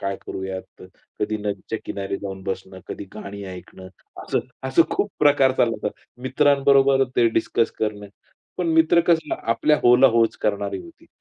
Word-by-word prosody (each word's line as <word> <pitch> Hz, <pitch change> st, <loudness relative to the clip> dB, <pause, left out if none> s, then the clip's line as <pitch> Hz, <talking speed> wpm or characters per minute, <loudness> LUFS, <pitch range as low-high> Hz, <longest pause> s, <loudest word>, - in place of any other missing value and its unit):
काय 100 Hz, 0 st, -2 dB
करूयात. 95 Hz, -1 st, -7 dB, 0.4 s
कधी 110 Hz, +1 st, 0 dB
नदीच्या 105 Hz, +1 st, -4 dB
किनारी 100 Hz, 0 st, -4 dB
जाऊन 95 Hz, -1 st, -7 dB
बसणं, 95 Hz, -1 st, -5 dB
कधी -, -, -6 dB
गाणी 100 Hz, -1 st, -8 dB
ऐकणं. 95 Hz, +1 st, -11 dB, 0.3 s
असं, -, -, -1 dB, 0.3 s
असं 130 Hz, +5 st, +5 dB
खूप 205 Hz, -, -1 dB
प्रकार 140 Hz, -3 st, +5 dB
चालला 115 Hz, -2 st, +2 dB
होता. 105 Hz, -, 0 dB, 0.3 s
मित्रांबरोबर 135 Hz, 0 st, +4 dB
ते 120 Hz, -, +5 dB
डिस्कस 115 Hz, +1 st, 0 dB
करणं. 105 Hz, -1 st, -3 dB, 0.5 s
पण 175 Hz, -2 st, 0 dB
मित्र 160 Hz, +1 st, +5 dB
कसं 165 Hz, -2 st, +2 dB
आपल्या 135 Hz, +7 st, +2 dB
"हो" 120 Hz, 0 st, +7 dB
ला 135 Hz, -, +7 dB
"हो" 115 Hz, -, +6 dB
च -, -, -14 dB
करणारी 105 Hz, -, -1 dB
होती. 335 Hz, -1 st, -16 dB
115 Hz, 160 wpm, -22 LUFS, 100-140 Hz, 0.5 s, हो